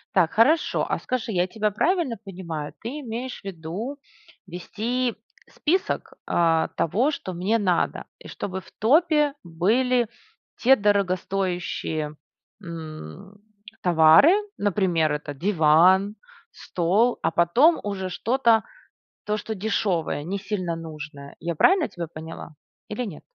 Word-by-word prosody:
Так, 170 -4 +3
хорошо, 295 +9 +3
а - - 0
скажи, 250 -3 -3
я 180 -2 +2
тебя 215 +2 -1
правильно 320 - +1
понимаю? 170 -6 -6
Ты 260 +7 -5
имеешь 245 0 -6
в - - -38
виду 195 - -6 0.5
вести 230 +7 -2 0.3
список, 370 +5 -1
а, 165 -1 +2
того, 225 - +1
что 190 -10 -5
мне 190 +6 +1
надо, 185 -4 0
и - - -12
чтобы 190 -1 -5
в - - -19
топе 300 - +3
были 230 +9 +1 0.5
те 265 +3 +5
дорогостоящие, 185 - -1 0.5
м, 165 - -9 0.4
товары, 165 - +6 0.3
например, 180 -6 +1
это 150 0 -4
диван, 185 +4 +4 0.4
стол, 195 +8 0
а - - +1
потом 230 - +4
уже 190 -2 -3
что-то, 230 +3 +2 0.6
то 210 0 -1
что 220 +1 -5
дешевое, 190 -7 -1
не 195 +4 -3
сильно 185 -4 -3
нужное. 150 -3 -9
Я 170 0 -3
правильно 365 - +4
тебя 170 -2 -6
поняла 160 0 -9 0.3
или 230 +4 -3
нет? 190 -9 -8
190 Hz, 125 wpm, -24 LUFS, 165-230 Hz, 0.6 s, товары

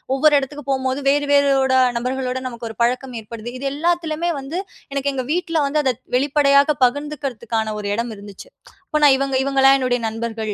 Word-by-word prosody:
ஒவ்வொரு 300 +2 +4
எடத்துக்கும் 285 +1 -7
போகும்போது 260 0 -1
வேறு 290 +1 +2
வேறோட 275 -2 +3 0.3
நபர்களோட 255 +1 -2
நமக்கு 235 -1 -7
ஒரு 225 - -15
பழக்கம் 250 +1 -1
ஏற்படுது. 230 +2 -8
இது 275 - -3
எல்லாத்துலமே 335 +1 -1
வந்து, 290 +7 -4 0.3
எனக்கு 280 0 -1
எங்க 255 -1 -3
வீட்ல 340 -2 -1
வந்து 300 +2 +1
அத 260 -2 +2 0.2
வெளிப்படையாக 280 +1 +3
பகிர்ந்துக்குறதுக்கான 275 -3 -3 0.4
ஒரு 205 - -5
எடம் 235 +1 -2
இருந்துச்சு. 205 - -12 0.4
அப்ப 305 -4 -1
நான் 285 -2 +7
இவங்க 275 0 -1
இவங்கள்லாம் 270 0 +4
என்னுடைய 250 -2 0
நண்பர்கள், 225 -1 -4
270 Hz, 165 wpm, -20 LUFS, 245-290 Hz, 0.4 s, நான்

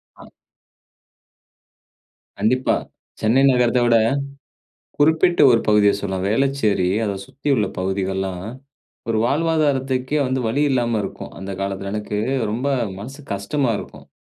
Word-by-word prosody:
அ. - - -14 2.2
கண்டிப்பா. 125 +5 +2 0.5
சென்னை 115 +5 +3
நகரத்த 125 -1 +2
விட, 115 -1 +5 1.0
குறிப்பிட்ட 160 +4 +3
ஒரு 115 - +4
பகுதிய 105 -1 +5
சொல்லலாம். 95 -2 -3
வேளச்சேரி, 115 -7 +1 0.2
அத 100 - -1
சுத்தி 135 +2 -7
உள்ள 105 -5 +1
பகுதிகள்லாம் 95 -1 -2 0.6
ஒரு 110 -1 +1
வாழ்வாதாரத்துக்கே 140 -2 +1
வந்து 130 +1 -1
வழி 140 +6 0
இல்லாம 120 -4 +1
இருக்கும். 95 - -7
அந்த 95 +1 -7
காலத்தில 100 0 -3
எனக்கு 105 -1 -3 0.3
ரொம்ப 125 +6 -2 0.3
மனசு 135 +8 -9
கஷ்டமா 115 +7 -1
இருக்கும். - - -11
115 Hz, 115 wpm, -21 LUFS, 100-135 Hz, 2.2 s, விட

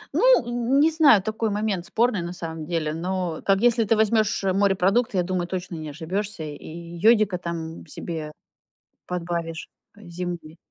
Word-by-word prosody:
Ну, - - +5
н 240 +3 +1
не 315 +3 +5
знаю, 285 - +6
такой 220 +1 -1
момент 205 -3 -2
спорный, 230 -4 +1
на 170 +1 -5
самом 160 -3 -6
деле. 160 -3 -1
Но, 175 0 -3
как 195 +1 +2
если 240 -1 +4
ты 225 +1 +2
возьмёшь 215 -2 +2
морепродукты, 195 +3 +2
я 180 - +3
думаю, 175 -1 -2
точно 180 -1 -5
не 155 -2 -6
ошибёшься, 175 +4 -4
и 150 -1 -8 0.3
йодика 210 -2 +4
там 165 -2 -6
себе 155 0 -6 0.8
подбавишь, 170 -2 -4 0.3
э, 210 - -14
земли. 170 -2 -6
185 Hz, 155 wpm, -24 LUFS, 170-215 Hz, 0.8 s, знаю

